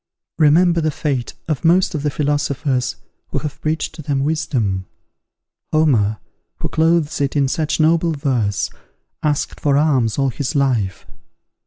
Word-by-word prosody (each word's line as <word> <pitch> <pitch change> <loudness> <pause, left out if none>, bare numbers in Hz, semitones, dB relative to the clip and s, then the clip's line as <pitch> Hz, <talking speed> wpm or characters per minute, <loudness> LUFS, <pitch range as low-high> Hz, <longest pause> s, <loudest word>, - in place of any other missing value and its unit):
Remember 165 +3 +4
the 155 - +1
fate 140 -5 -2
of 155 -1 -2
most 180 +4 +3
of 155 - -2
the 150 - 0
philosophers 140 -3 -1 0.3
who - - -4
have 145 +1 -5
preached 155 +1 -1
to 160 - -9
them 140 -2 -1
wisdom. 125 - -1 0.8
Homer, 120 -10 +3 0.4
who - - -4
clothes 160 -2 +1
it 140 0 0
in 140 -2 +3
such 155 +3 -1
noble 165 +1 +3
verse, 120 -9 -1 0.5
asked 150 -1 -1
for 140 -2 +2
alms 135 -8 +2
all 135 -1 +2
his 140 +4 -3
life. 120 -10 0
145 Hz, 145 wpm, -19 LUFS, 130-155 Hz, 0.8 s, Remember